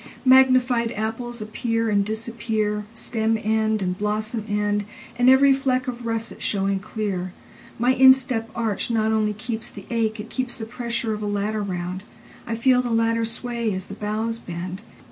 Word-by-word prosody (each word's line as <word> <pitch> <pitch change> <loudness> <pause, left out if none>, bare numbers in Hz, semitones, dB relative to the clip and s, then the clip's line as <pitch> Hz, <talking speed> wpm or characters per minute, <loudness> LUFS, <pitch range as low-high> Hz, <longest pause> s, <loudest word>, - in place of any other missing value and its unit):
Magnified 255 -2 +5
apples 225 +2 -4
appear 225 +1 -1
and 200 -1 +3
disappear, 220 -1 -2
Stem 225 -1 0
end 220 -1 +1
and 180 0 -1
blossom 215 +2 -2
end, 205 0 0 0.3
And 245 +1 +4
every 270 +1 +7
fleck 260 -1 0
of 240 -1 -4
russet 225 0 -3
showing 195 -1 0
clear.My 210 +4 -3
instep 260 -3 +5
arch 225 -3 -1
not 220 -1 +1
only 215 -1 +1
keeps 220 +1 -5
the 200 - -11
ache, 225 -1 0
It 210 - -7
keeps 255 -2 -2
the 220 - -6
pressure 235 -1 -2
of 210 - -5
a 210 - -2
ladder 205 +1 -1
round.I 185 +4 -6
feel 250 +2 +4
the 245 - -3
ladder 230 0 +2
sway 235 0 -2
as 190 0 -5
the - - -9
boughs 215 +2 -2
bend. 180 0 -6
225 Hz, 160 wpm, -23 LUFS, 210-235 Hz, 0.3 s, every